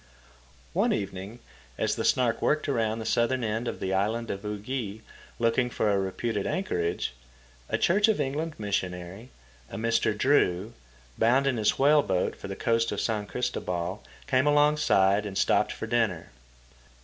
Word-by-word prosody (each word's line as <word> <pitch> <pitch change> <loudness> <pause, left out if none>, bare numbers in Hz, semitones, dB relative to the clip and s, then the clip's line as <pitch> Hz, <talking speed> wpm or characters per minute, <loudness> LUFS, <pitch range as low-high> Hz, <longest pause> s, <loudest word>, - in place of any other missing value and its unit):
One - - +2
evening, 100 +3 -5 0.4
as - - 0
the - - -2
Snark 120 -3 +2
worked 150 0 +1
around 115 -5 0
the 110 - -5
southern 120 +3 +1
end 110 +2 -2
of - - -4
the 95 0 -2
island 110 +4 0
of 100 - -5
Ugi, 105 +1 -4 0.4
looking 120 +2 +1
for 105 -3 0
a 100 - +2
reputed 100 +2 -2
anchorage, 85 - -1 0.6
a - - +1
Church 205 +5 +3
of 220 -5 +2
England 150 +3 -2
missionary, 95 +1 -4 0.4
a - - -7
Mr. 115 -1 +1
Drew, 110 -5 +2 0.5
bound 130 +5 +4
in 135 -3 +1
his 105 -2 +1
whaleboat 140 -10 +3
for - - -9
the 95 - -5
coast 115 +1 +1
of 100 - -2
San 105 -2 -1
Cristoval, 95 -6 -3 0.2
came 130 0 +2
alongside 145 -10 +4
and 100 -2 -5
stopped - - +2
for - - -5
dinner. 110 -7 -1
115 Hz, 155 wpm, -27 LUFS, 100-130 Hz, 0.6 s, bound